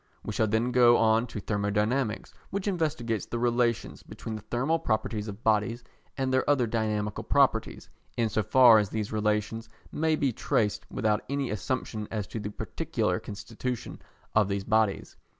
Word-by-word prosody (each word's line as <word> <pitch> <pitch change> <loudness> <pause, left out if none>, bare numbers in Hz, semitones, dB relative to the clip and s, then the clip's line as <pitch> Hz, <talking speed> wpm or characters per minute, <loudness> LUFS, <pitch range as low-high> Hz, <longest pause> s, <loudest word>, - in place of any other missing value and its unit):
We - - -4
shall 110 - +1
then 110 +4 +1
go 120 -1 +6
on 115 +2 +3
to 110 - -6
Thermodynamics, 105 +4 -1 0.2
which 200 +1 -3
investigates 145 - -1
the 120 - -3
relations 120 -1 0
between 115 - -8
the 110 - -7
thermal 135 +10 0
properties 110 -5 -1
of 105 +1 -8
bodies 110 +2 +1 0.3
and 130 -1 0
their 130 - +2
other 140 -4 +3
dynamical 110 -2 -2
properties, - - +1 0.3
in 115 - +2
so 110 - 0
far 115 +1 +7
as 105 -2 -1
these 110 -1 -3
relations 105 +1 -1 0.2
may 160 0 +1
be 140 -4 0
traced 105 0 0
without 105 -1 0
any 140 -1 -1
assumption 110 0 -3
as 105 -3 -3
to 115 - -5
the 105 - -4
particular 105 - -2
constitution 115 +4 -6 0.3
of 110 -2 +4
these 100 0 -1
bodies. 110 -1 0
110 Hz, 165 wpm, -28 LUFS, 105-125 Hz, 0.3 s, far